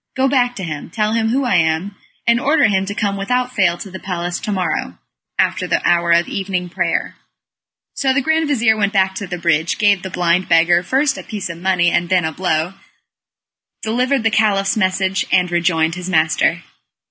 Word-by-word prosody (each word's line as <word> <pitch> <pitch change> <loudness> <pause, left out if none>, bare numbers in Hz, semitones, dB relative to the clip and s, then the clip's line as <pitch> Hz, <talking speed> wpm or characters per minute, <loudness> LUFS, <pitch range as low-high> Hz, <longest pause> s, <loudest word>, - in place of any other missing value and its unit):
Go 265 +1 +2
back 245 -2 +1
to 195 - -6
him; 150 -4 -6
tell 215 +4 -1
him 225 -1 +1
who 265 +3 0
I 235 -7 +2
am, 165 +4 0 0.3
and 235 0 +3
order 290 +3 +2
him 195 -2 0
to 200 - -4
come 200 -2 -1
without 250 +5 -1
fail 185 -6 +2
to 195 - -9
the 190 - -8
palace 175 -2 -4
to 210 - -4
morrow, 170 - -2 0.4
after - - 0
the - - 0
hour 170 0 +2
of 170 0 +3
evening 185 -2 -3
prayer." - - -2 0.8
So 270 -1 0
the 265 - +2
grand 315 +3 +1
vizir 235 -6 +2
went 205 -1 0
back 190 -1 +2
to 195 +1 -6
the 180 -1 -5
bridge; 165 -1 0
gave 205 -2 +3
the 190 - -6
blind 175 0 0
beggar 170 +1 +4
first 265 +10 0
a - - -8
piece 205 -4 -5
of 170 - -10
money 180 -2 +2
and 175 0 0
then 180 -3 +2
a 160 - -1
blow, 165 +1 -1 1.1
delivered 250 +3 0
the 225 - +2
Caliph's 205 -3 +2
message, 190 -1 0
and 180 -1 +2
rejoined 165 -2 +1
his 180 +1 -6
master. 165 0 +1
190 Hz, 200 wpm, -18 LUFS, 175-220 Hz, 1.1 s, beggar